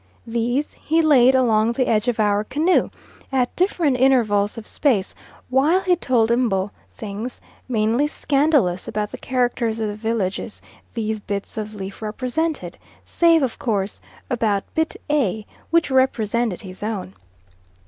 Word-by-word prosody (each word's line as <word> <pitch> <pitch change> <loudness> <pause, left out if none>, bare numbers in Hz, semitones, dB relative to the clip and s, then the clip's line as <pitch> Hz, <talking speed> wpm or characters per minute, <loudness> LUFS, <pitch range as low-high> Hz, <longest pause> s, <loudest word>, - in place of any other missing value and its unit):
These 240 +5 -1
he 320 +2 +2
laid 265 -4 +5
along 230 -3 +3
the 255 +1 +1
edge 215 +1 +1
of 240 -2 0
our 205 -1 +2
canoe 305 - +2 0.4
at 255 -2 0
different 340 -7 +1
intervals 225 -6 +2
of 225 - -7
space, 220 -9 0 0.3
while 290 +8 +3
he 365 -2 +3
told 240 -8 +1
M'bo 210 -5 +1 0.2
things, 215 +3 -6 0.3
mainly 230 +4 +2
scandalous, 280 - +1
about 210 0 -3
the - - -8
characters 240 -3 -1
of 220 - -1
the 205 - -5
villages 215 -2 -3 0.4
these 220 -1 -2
bits 200 -1 -5
of 215 0 -5
leaf 195 0 -7
represented, 255 +9 -3 0.3
save 335 -3 +3
of 255 - -2
course 200 -4 -2 0.3
about 220 -6 0
bit 320 0 0
A, 220 - 0 0.2
which 330 -4 +2
represented 235 -5 +1
his 185 -1 -10
own. 210 - -4
235 Hz, 140 wpm, -22 LUFS, 210-270 Hz, 0.4 s, laid